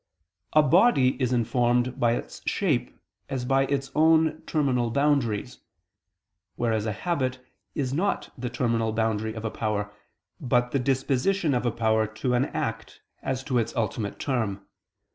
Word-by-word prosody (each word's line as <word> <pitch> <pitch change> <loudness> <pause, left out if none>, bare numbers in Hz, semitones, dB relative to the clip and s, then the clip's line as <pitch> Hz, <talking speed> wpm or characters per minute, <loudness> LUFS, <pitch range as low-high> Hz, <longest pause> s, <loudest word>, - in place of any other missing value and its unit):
3: 155 - +7
A - - 0
body 145 - +4
is 125 -1 +1
informed 120 +1 +1
by 120 -1 +3
its - - -5
shape - - -1 0.3
as 130 -2 -3
by 135 +1 +2
its 135 -1 -2
own 160 +1 +3
terminal 130 -6 +1
boundaries: 140 -5 0 1.0
whereas 110 -2 0
a - - 0
habit 130 - -1 0.4
is 135 -5 -1
not 190 +7 -1
the 125 0 -4
terminal 115 -3 0
boundary 110 0 -1
of 110 0 -6
a 110 - -2
power, 105 -2 -2 0.5
but 125 -4 +1
the 140 - +1
disposition 135 +6 +1
of 125 -1 0
a - - +2
power 110 -1 +1
to 110 +4 -2
an 125 +2 +3
act 125 -8 -4 0.2
as 130 0 -2
to 130 -2 +1
its 115 0 -2
ultimate 110 -2 -2
term. 110 -8 -2
125 Hz, 155 wpm, -26 LUFS, 115-140 Hz, 1.0 s, 3